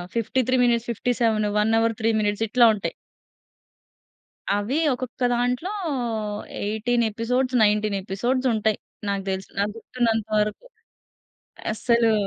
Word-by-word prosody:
53 255 +3 +1
minutes, 235 -1 +1
57 230 -2 +1
1:03 220 -1 +1
ఇట్లా 240 0 +6
ఉంటాయి. 200 - -3 1.6
అవీ 205 +6 -1 0.2
ఒక్కొక్క 250 0 -5
దాంట్లో 250 +10 -1 0.9
18 220 +3 0
ఎపిసోడ్స్, 250 +4 0
19 210 -1 +2
ఎపిసోడ్స్ 245 +7 0
ఉంటాయి. 215 -1 +1 0.3
నాకు 200 -1 -1
దెలిసి, 190 0 -3
నాకు 205 +1 0
గుర్తున్నంత 225 -2 -1
వరకు. 210 - -2 1.1
అస్సలూ 230 +1 +2
225 Hz, 100 wpm, -24 LUFS, 210-245 Hz, 1.6 s, ఇట్లా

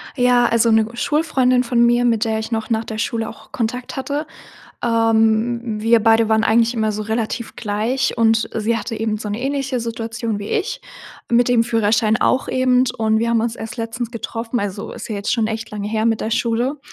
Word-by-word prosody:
Ja, 245 -1 +4
also 230 0 +3
'ne 220 0 +4
Schulfreundin 255 -2 +1
von 235 -1 +1
mir, 240 +1 +3
mit 230 -1 +2
der 220 -1 0
ich 220 - -6
noch 220 -1 -2
nach 225 -1 0
der 220 - -6
Schule 225 0 -2
auch - - -14
Kontakt 245 +1 -3
hatte, 285 +3 -3 0.6
ähm, 225 0 +1
wir 230 +1 +4
beide 225 0 +4
waren 220 0 +3
eigentlich 230 +2 +3
immer 220 -2 0
so 210 +1 -4
relativ 225 +2 -3
gleich 230 +5 -1
und 225 -1 +2
sie 225 +1 0
hatte 225 +1 -4
eben 215 -1 -1
so 210 - -5
'ne 210 +3 -3
ähnliche 270 -1 -1
Situation 230 -1 -4
wie 205 +1 -6
ich 465 +4 -2 0.5
mit 240 +1 +3
dem 240 -2 +3
Führerschein 220 -1 +2
auch 260 - +1
eben. 255 -1 +2
Und 220 -1 +1
wir 230 +1 0
haben 230 -1 +2
uns 230 +1 -2
erst 225 +2 -7
letztens 230 0 -4
getroffen, 230 +1 -4
also 200 0 -4
ist - - -8
ja 215 - -3
jetzt 200 - -2
schon 225 -3 +1
echt 225 0 -4
lange 205 -1 -4
her 220 0 -1
mit 225 -1 +1
der 220 - -2
Schule, 235 +5 0
230 Hz, 205 wpm, -20 LUFS, 220-245 Hz, 0.6 s, Ja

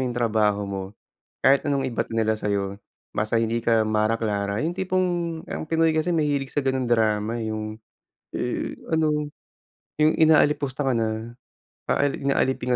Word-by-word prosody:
yung 120 - -5
trabaho 110 -3 +2
mo, 100 -1 -4 0.6
kahit 135 +2 +4
anong 140 -3 0
ibato 120 - -3
nila 110 -1 +1
sayo, 100 -2 -2 0.4
basta 110 +2 +1
hindi 115 +1 -1
ka 110 -2 +3
Mara 110 +1 +1
Clara, 100 -2 -1
yung 165 +3 -1
tipong 185 0 +1 0.4
ang - - -4
Pinoy 160 0 +2
kasi 160 +3 +1
nahilig 145 -5 0
sa - - 0
ganong 130 -3 -1
drama 110 0 +1
eh, 110 - -3
yung, 110 0 -5 0.6
eh, - - -2 0.2
ano 150 -2 +1 0.6
yung 155 0 +4
inaalipusta 150 -3 +3
ka 135 - +1
na, 115 0 -1 0.6
paali 145 -1 +1
inaalipin 130 -2 +1
120 Hz, 150 wpm, -24 LUFS, 110-145 Hz, 0.6 s, kahit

